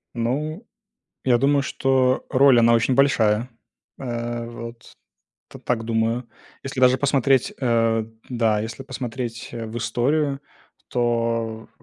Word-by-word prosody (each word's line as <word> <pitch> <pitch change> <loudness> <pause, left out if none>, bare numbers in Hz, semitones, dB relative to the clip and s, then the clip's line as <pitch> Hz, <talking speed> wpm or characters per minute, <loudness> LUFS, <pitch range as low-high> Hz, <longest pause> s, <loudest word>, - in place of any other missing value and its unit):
Ну, 150 - -2 0.6
я 125 -2 +4
думаю, 140 +2 +3
что 130 -1 +1
роль, 135 -1 +6
она 115 0 +5
очень 115 +3 +2
большая. 120 -4 +3 0.5
Э, 120 -2 -4
вот 115 -1 -10 0.6
т - - -12
так 115 -2 -2
думаю, 115 +1 -1 0.3
если 135 -1 -4
даже 130 0 +6
посмотреть, 135 -2 +2
э, 115 -3 +2 0.2
да, 115 -4 +1
если 115 +4 -6
посмотреть, 125 -3 -5
э, 115 -1 -5
в 110 +1 -7
историю, 135 +5 0 0.5
то, 115 -2 -1
120 Hz, 120 wpm, -23 LUFS, 115-135 Hz, 0.6 s, роль